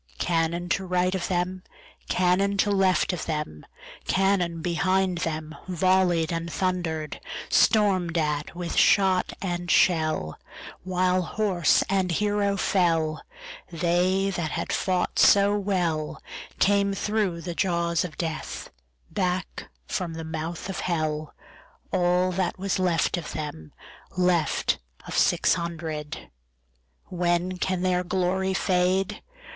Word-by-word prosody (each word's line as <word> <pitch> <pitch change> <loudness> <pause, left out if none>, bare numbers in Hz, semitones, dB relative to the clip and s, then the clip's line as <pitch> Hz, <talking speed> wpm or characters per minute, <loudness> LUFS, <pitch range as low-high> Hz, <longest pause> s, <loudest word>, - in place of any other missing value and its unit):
Cannon 170 - 0
to 195 - 0
right 180 0 +1
of 190 -2 -2
them, 180 +1 -1 0.5
Cannon 185 +2 +2
to 205 +1 +2
left 190 -1 +2
of 175 - -5
them, 150 - -4 0.4
Cannon 185 -4 +1
behind 185 +1 +1
themVolley'd 170 +2 0
and 165 0 -3
thunder'd; 175 -5 -2 0.3
Storm'd 185 -6 +3
at 150 0 -1
with 175 -1 -4
shot 190 -2 +4
and 175 -2 -3
shell, 155 - +2 0.4
While 185 0 +1
horse 180 -3 +2
and 190 -1 +1
hero 205 +2 +1
fell, 165 -5 +1 0.5
They 180 +3 +1
that 170 -4 -2
had - - -3
fought 185 -2 0
so 200 0 +6
wellCame 195 +2 -1
thro' 210 -5 0
the 170 +1 -5
jaws 170 -2 0
of 165 -4 -7
Death, 160 -2 -4 0.4
Back 185 -1 -2 0.2
from 175 -3 -3
the 165 - -5
mouth 160 +2 -5
of 195 - -4
Hell, 155 -3 -2 0.6
All 180 +1 +2
that 180 -1 -1
was 190 0 -1
left 180 -1 +1
of 170 - -6
them, 145 - -6 0.5
Left 180 -4 +1 0.3
of - - -5
six - - +3
hundred. 160 - -5 0.8
When 175 +1 0
can 185 -1 -1
their 180 -1 +1
glory 190 +1 0
fade? 185 0 +1
180 Hz, 120 wpm, -26 LUFS, 165-190 Hz, 0.8 s, so